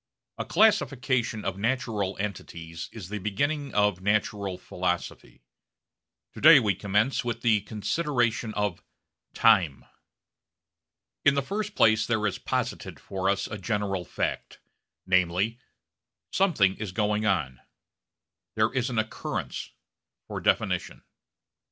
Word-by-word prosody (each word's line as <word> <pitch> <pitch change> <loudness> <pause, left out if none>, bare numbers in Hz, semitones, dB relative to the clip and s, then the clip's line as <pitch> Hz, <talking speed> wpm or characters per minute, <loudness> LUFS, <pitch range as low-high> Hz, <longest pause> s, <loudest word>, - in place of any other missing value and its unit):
A - - -2
classification 130 - +2
of 95 0 -3
natural 110 -4 -1
entities 85 -5 -6
is 100 -6 -9
the 105 0 -4
beginning 140 +9 -1
of 105 -3 +2
natural 100 -1 0
philosophy. 90 -8 -4 0.9
To - - -10
day 155 -1 +9
we 105 -5 +1
commence 105 +8 0
with 120 -1 -3
the 110 -3 +4
consideration 120 +1 -1
of 105 -4 -1 0.5
Time. 90 -12 +4 1.4
In 140 -1 +5
the 140 - +1
first 205 +6 -4
place 110 0 +4
there 110 -2 +1
is 100 - -1
posited - - -3
for 95 0 -2
us 100 - 0
a 110 - -6
general 100 -2 -1
fact: - - -4 0.5
namely, 95 +5 +1 0.7
something 130 - +2
is 105 -4 -5
going 105 +2 0
on; 75 - 0 0.9
there 110 +2 +2
is 130 -1 0
an 120 - -3
occurrence 110 0 -3 0.6
for - - -5
definition. - - 0
105 Hz, 120 wpm, -27 LUFS, 95-120 Hz, 1.4 s, day